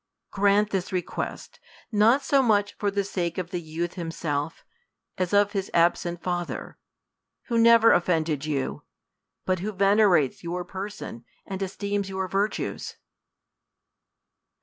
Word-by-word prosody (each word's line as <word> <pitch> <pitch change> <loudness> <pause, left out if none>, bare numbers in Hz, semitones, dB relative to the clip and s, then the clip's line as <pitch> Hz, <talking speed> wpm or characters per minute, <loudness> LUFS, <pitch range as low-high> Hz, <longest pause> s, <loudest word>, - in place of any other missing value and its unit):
Grant 205 +1 +3
this 190 -2 -2
request, 180 -2 -4 0.3
not 225 +6 +4
so 275 0 +3
much 205 -4 +2
for 205 - -1
the 200 0 0
sake 175 -3 -3
of 180 -2 -4
the 180 - -3
youth 165 +2 -4
himxself, 165 -3 -3 0.6
as 185 -2 0
of 205 0 +4
his 195 -2 -3
absent 170 0 +2
father, 175 -1 -4 0.7
who 235 - +1
never 230 0 +7
offended 160 -4 +1
you, 145 -3 -2 0.6
but 185 -1 +1
who 205 +4 -3
venerates 195 -8 +3
your 175 +1 -3
person 190 - -7 0.2
and 190 0 -6
esteems 200 +1 -2
your 190 0 -2
virtues. 200 +3 -2
190 Hz, 125 wpm, -26 LUFS, 170-205 Hz, 0.7 s, never